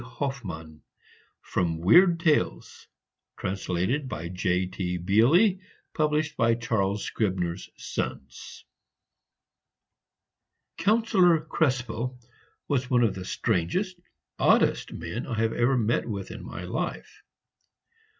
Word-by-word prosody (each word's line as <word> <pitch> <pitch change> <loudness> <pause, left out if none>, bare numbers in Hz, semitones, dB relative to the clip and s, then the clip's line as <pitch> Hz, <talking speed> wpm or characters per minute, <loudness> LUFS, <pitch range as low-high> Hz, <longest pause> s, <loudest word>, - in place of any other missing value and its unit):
HOFFMANN 100 - -6 0.6
From 85 -2 -1
"Weird 170 - +6
Tales," 160 -3 0 0.5
translated 95 - -2
by 85 -6 -5
J.T. 90 0 -1
Beally. 130 - +4 0.3
Published 155 0 0
by 115 0 +3
Charles 105 -4 -1
Scribner's 95 -4 -2
Sons. 65 -1 -6 2.1
Councillor 190 -4 +4
Krespel 125 -5 -1 0.5
was 130 -3 0
one 125 -1 +3
of 110 -4 +2
the 95 -1 -7
strangest, 120 - -1 0.4
oddest - - +3
men 85 +9 -5
I 115 -3 -3
ever 120 +3 +2
met 120 +1 0
with 100 -3 -5
in - - -8
my - - -7
life. - - -5
115 Hz, 95 wpm, -27 LUFS, 95-150 Hz, 2.1 s, Weird